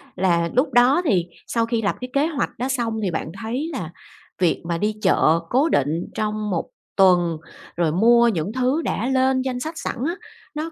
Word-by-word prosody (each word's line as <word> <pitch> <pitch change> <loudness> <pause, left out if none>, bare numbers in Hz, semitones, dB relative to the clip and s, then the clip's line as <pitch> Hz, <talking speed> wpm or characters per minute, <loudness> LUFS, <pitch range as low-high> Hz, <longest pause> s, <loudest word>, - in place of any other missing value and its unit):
Là 170 -2 +1
lúc 255 +1 +1
đó 250 +7 +5
thì 190 - +2 0.2
sau 230 -1 0
khi 230 -1 -1
lập 205 - 0
cái 250 - -5
kế 280 +2 +2
hoạch 320 -4 -2
đó 250 - -2
xong 235 -4 -1
thì 190 - 0
bạn 160 -1 -4
thấy 250 +8 -3
là 175 - -4 0.5
việc 175 -3 +1
mà 170 0 -1
đi 210 +4 -1
chợ 160 -4 +3
cố 275 +6 +2
định 155 - 0
trong 215 0 -2
một 175 -4 -2 0.3
tuần, 175 -4 +4 0.4
rồi 170 -2 +1
mua 235 +7 +5
những 190 -2 -1
thứ 260 +5 +1
đã 240 -6 -2
lên 260 0 +2
danh 255 -1 -3
sách 315 +5 -5
sẵn - - -4
á, 340 - -2 0.4
nó 315 +2 -4
225 Hz, 200 wpm, -22 LUFS, 180-260 Hz, 0.5 s, đó